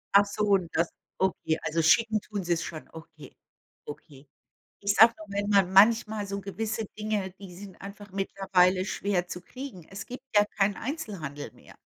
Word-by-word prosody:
Ach 200 - +8
so, 205 +1 -3
und 195 -4 +2
das 170 +1 +2 0.3
okay. 175 -4 0
Also, 160 +1 0
schicken 215 +6 +4
tun 205 -3 -5
sie's 170 -1 0
schon. 155 -2 -7
Okay. 160 -2 -13 0.5
Okay. 145 -1 -11 0.5
Ich 200 0 +1
sage 230 +2 +7
nur, 215 - -10
wenn 200 +1 -2
man 195 -3 +3
manchmal 215 +1 +5
so 200 0 -4
gewisse 215 +3 -3
Dinge, 210 -3 -2
die 190 -3 -11
sind 195 -1 -11
einfach 205 +1 -10
mittlerweile 190 -1 +2
schwer 190 -2 -1
zu 180 - -6
kriegen. 245 - -9
Es 195 +1 -7
gibt 255 +2 -9
ja 205 - +7
keinen 200 0 +3
Einzelhandel 195 - -5
mehr. - - -17
195 Hz, 170 wpm, -28 LUFS, 175-210 Hz, 0.5 s, Ach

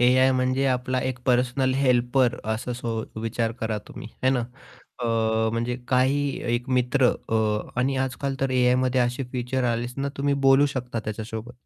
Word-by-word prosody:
AI 130 +2 +5
म्हणजे 130 +1 +1
आपला 130 0 0
एक 130 -1 -2
पर्सनल 130 +1 +2
हेल्पर 125 -1 +2 0.2
असं 115 -1 -3 0.2
विचार 115 0 -1
करा 110 -1 -1
तुम्ही - - -9
आहे 130 - +4
ना 130 - +1 0.6
अ, - - -4 0.5
म्हणजे 120 +1 -1
काही 135 +3 +2 0.3
एक 120 +2 -3
मित्र 125 +1 +3 0.2
अ, 115 - -1 0.5
आणि 135 +2 +1
आजकाल 130 +1 -2
तर 135 -1 0
एआयमध्ये 125 0 +2
असे 125 +2 0
फीचर 125 +1 -1
आले 115 +1 -2
ना 140 - -1
तुम्ही 140 0 +1
बोलू 135 +2 +6
शकता 125 -2 -3
त्याच्यासोबत. 110 +2 -5
125 Hz, 155 wpm, -25 LUFS, 120-130 Hz, 0.6 s, बोलू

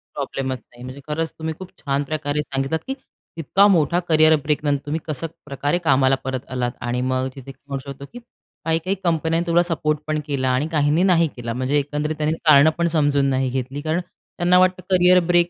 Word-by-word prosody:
प्रॉब्लेमच 130 -1 -3
नाही. 120 0 -16
म्हणजे 130 +2 -8
खरंच 160 +2 -2
तुम्ही 160 0 -3
खूप 185 -1 -8
छान 140 0 -1
प्रकारे 145 0 -2
सांगितलात, 135 +2 -2
की 270 - -1 0.4
इतका 195 +6 +4
मोठा 175 -2 +3
करिअर 155 0 +6
ब्रेक 150 0 0
नंतर 145 -1 +1
तुम्ही 155 +3 -2
कसं 155 +1 -2 0.2
प्रकारे 145 +3 -1
कामाला 135 -2 +4
परत 130 -1 -4
आलात 125 -1 -1
आणि 120 +1 -2
मग 130 0 0
तिथे 135 0 -9 0.2
म्हणू 140 -1 -3
शकतो, 140 +1 -9
की 245 - -8 0.5
काही-काही 165 +4 0
कंपन्यांनी 165 0 0
तुला 170 +1 +4
सपोर्ट 155 -3 -1
पण 155 0 0
केला 130 -3 0
आणि 130 +5 +1
काहींनी 150 +2 +2
नाही 170 -3 +4
केला. 115 -1 -5
म्हणजे 130 +4 0
एकंदरीत 150 +2 -3
त्यांनी 155 +1 0
कारणं 155 0 +7
पण 170 0 +1
समजून 145 -3 +2
नाही 130 -1 0
घेतली, 130 +2 -4
कारण 160 +3 -1
त्यांना 175 0 -1
वाटतं 185 0 +2
करियर 180 -1 +5
ब्रेक 175 0 +4
150 Hz, 195 wpm, -21 LUFS, 135-165 Hz, 0.5 s, कारणं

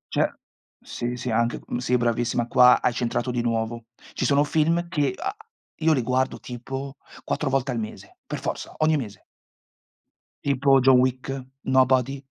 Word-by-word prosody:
Ce - - +2 0.5
sì, 120 +1 -4
sì 125 -1 -4
anche, 115 +2 +1
uhm, - - -3
sì 125 0 +1
bravissima, 120 0 0
qua 125 0 +6
hai 125 - +1
centrato 120 +1 -1
di 120 - -1
nuovo. 115 0 -2 0.3
Ci - - -2
sono 140 +2 +4
film 165 +3 +1
che, 145 -6 0
a 395 +2 -3 0.4
io 160 0 +2
li 130 -4 0
guardo 130 +2 0
tipo 135 +3 -7 0.3
4 150 - -1
volte 135 0 0
al 115 - -2
mese, 110 - -8
per - - -4
forza, - - -5
ogni 155 0 +3
mese. 105 -8 -7 1.2
Tipo 135 -1 +3
John 130 -1 +6
Wick, 130 +1 0 0.3
Nobody 130 0 +2
130 Hz, 160 wpm, -24 LUFS, 120-140 Hz, 1.2 s, qua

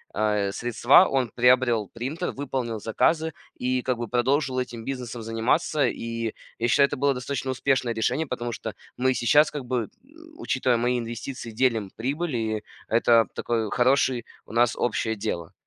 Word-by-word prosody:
э, 105 -2 +1
средства. 120 - +4
Он 130 -3 0
приобрел 120 -3 +3
принтер, 140 +10 -3
выполнил 130 -5 -3
заказы 160 +9 +1 0.2
и 125 0 -1
как 130 -2 0
бы 120 - -3
продолжил 130 +3 +1
этим 120 -2 -5
бизнесом 125 -3 -5
заниматься. 120 +7 +1
И 115 -1 -3 0.2
я 120 - 0
считаю, 140 +3 +5
это 145 - -5
было 140 +1 +2
достаточно 130 +1 -3
успешное 130 -2 0
решение, 125 +8 0
потому 120 -3 -4
что - - -5 0.2
мы 130 +1 +2
сейчас, 135 +6 +4
как 145 -3 -5
бы, 125 0 -1
м, - - -10 0.5
учитывая 125 -2 +1
мои 125 +1 +1
инвестиции, 120 +1 -6
делим 110 -4 0
прибыль, 145 +5 -2
и 110 -2 -2 0.3
это 115 0 +4
такое 115 -2 -1
хороший 125 0 +2 0.2
у - - -11
нас 120 0 +3
общее 110 -2 -1
дело. 90 -6 -4
120 Hz, 160 wpm, -25 LUFS, 115-130 Hz, 0.5 s, считаю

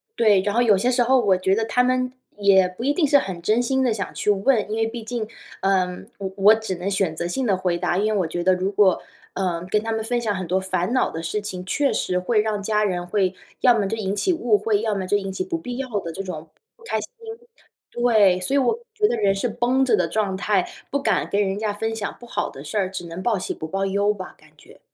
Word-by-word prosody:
对， 210 -4 +4
然 205 +1 -1
后 240 - +3
有 215 -5 +4
些 240 +6 +1
时 250 0 +2
候 255 +2 +4
我 200 -5 +3
觉 190 +1 +1
得 225 +1 0
他 250 - +2
们 255 0 0 0.2
也 195 -2 +5
不 185 +6 -8
一 280 +3 +2
定 310 -1 +2
是 285 - +6
很 190 -9 -3
真 215 +6 +2
心 265 +2 +1
地 250 - +2
想 205 -3 -3
去 - - -2
问。 205 +2 +2
因 220 - -1
为 225 - +2
毕 225 0 -5
竟， 225 -1 -4 0.3
呃， 190 -2 +2 0.3
我 195 -1 -4
我 205 +2 +7
只 220 -4 -4
能 180 +2 -5
选 190 -5 0
择 170 +2 -3
性 260 +10 -2
地 195 -3 +2
回 180 -2 0
答， 175 -1 0
因 215 +2 +1
为 205 - +1
我 180 - 0
觉 175 +2 -3
得 185 +1 +4
如 185 +2 -1
果， 195 -2 +3 0.3
呃， 175 -3 -2
跟 210 - +3
他 225 +1 -3
们 220 0 -1
分 240 +2 -1
享 215 -3 -1
很 185 -1 -4
多 185 +3 +1
烦 190 +2 -1
恼 255 - +2
的 165 - -6
事 210 +4 -2
情， 185 -3 -6
确 280 +8 +1
实 180 0 0
会 215 +5 +1
让 210 -1 -2
家 210 +1 +1
人 180 -3 -1
会 190 0 +1 0.3
要 250 - +6
么 205 -2 0
就 225 +3 -3
引 200 -2 -2
起 370 - +1
误 240 -9 +2
会， 210 -2 +1
要 220 -1 0
么 190 -2 -3
就 205 - +2
引 195 -1 -4
起 - - -2
不 365 -3 -3
必 250 -7 -6
要 265 -1 -4
的 170 - -6
这 190 - -5
种 170 -5 -7 0.3
不 470 - -22
开 - - -1
心。 - - -6 0.8
对， 215 -6 +4
所 185 - -1
以 - - +4
我 260 - +1 0.2
觉 425 -1 +2
得 - - 0
人 200 -3 +2
是 220 +5 -1
绷 245 +4 +1
着 240 -4 +4
的 180 -4 +1
状 195 +1 -1
态， 190 0 +1 0.2
不 280 - +1
敢 - - +1
跟 200 - +1
人 195 -1 -1
家 215 -1 -1
分 225 +2 -3
享 210 -3 -4
不 240 - -12
好 - - -2
的 135 - -10
事 155 - -4
儿， 190 -2 0
只 185 -2 -6
能 170 +3 -7
报 225 -5 +1
喜 - - -3
不 160 - -6
报 195 +4 -1
忧 200 +2 +1
吧， 185 -3 -9
感 155 0 -21
觉。 - - -18
205 Hz, 295 characters per minute, -23 LUFS, 185-235 Hz, 0.8 s, 我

